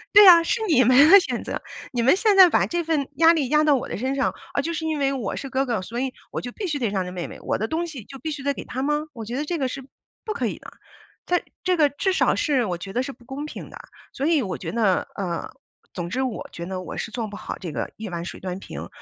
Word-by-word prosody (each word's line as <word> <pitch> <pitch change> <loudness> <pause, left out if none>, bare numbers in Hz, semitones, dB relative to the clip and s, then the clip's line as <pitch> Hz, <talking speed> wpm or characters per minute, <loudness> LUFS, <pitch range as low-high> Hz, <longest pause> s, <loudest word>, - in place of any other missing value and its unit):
对 410 -1 +10
啊， 340 -2 +9
是 450 +7 0
你 265 -8 +5
们 255 +6 +7
的 400 +1 +10
选 375 - -3
择， - - -4 0.3
你 240 -2 0
们 265 +8 +6
现 410 0 +3
在 375 -1 +10
把 - - +2
这 345 0 -1
份 305 -4 0
压 330 +3 +6
力 285 -6 0
压 300 0 +4
到 300 -2 +5
我 260 - -3
的 - - -4
身 260 +4 -1
上。 275 - +1 0.2
啊， - - +1
就 330 +4 -3
是 320 -1 -3
因 310 -2 -1
为 275 0 +2
我 250 -8 -3
是 270 - -6
哥 265 +1 0
哥， 235 -7 -1
所 235 +6 -5
以 260 -1 -2 0.2
我 - - -4
就 245 - -6
必 395 - -5
须 305 -4 -1
得 240 -5 0
让 195 -2 -1
着 180 - -6
妹 180 -2 -4
妹， - - -10
我 - - -1
的 220 - -2
东 335 +5 -2
西 275 -8 -8
就 270 +5 -11
必 315 - -4
须 290 -3 -5
得 280 0 +1
给 - - -7
她 260 +2 -4
吗？ 295 +2 0
我 225 -4 -7
觉 235 +3 -5
得 290 - -1
这 335 +3 -2
个 270 - 0
是 265 +1 -6 0.4
不 435 - -4
可 - - -2
以 - - -3
的， - - -12 0.5
在 355 0 +1 0.2
这 365 0 +2
个 300 -3 +5
至 330 +8 -1
少 - - +3
是 275 -5 +1
我 180 -4 -2
觉 195 +3 -8
得 245 - +1
是 270 +2 -4
不 240 -2 -18
公 270 +3 -6
平 - - -9
的。 - - -9 0.4
所 275 - -1
以 320 -5 +3
我 190 -3 -3
觉 - - -5
得 215 -5 +1
呃， 175 -4 -3 0.5
总 175 -1 -3
之 260 - -1
我 255 -4 -3
觉 170 0 -7
得 190 0 -4
我 - - -7
是 - - -4
做 225 0 -4
不 205 - -9
好 - - -6
这 170 -4 -5
个 - - -4
一 220 0 -6
碗 170 -1 -4
水 - - -7
端 185 0 -5
平。 - - -8
270 Hz, 320 characters per minute, -24 LUFS, 225-315 Hz, 0.5 s, 对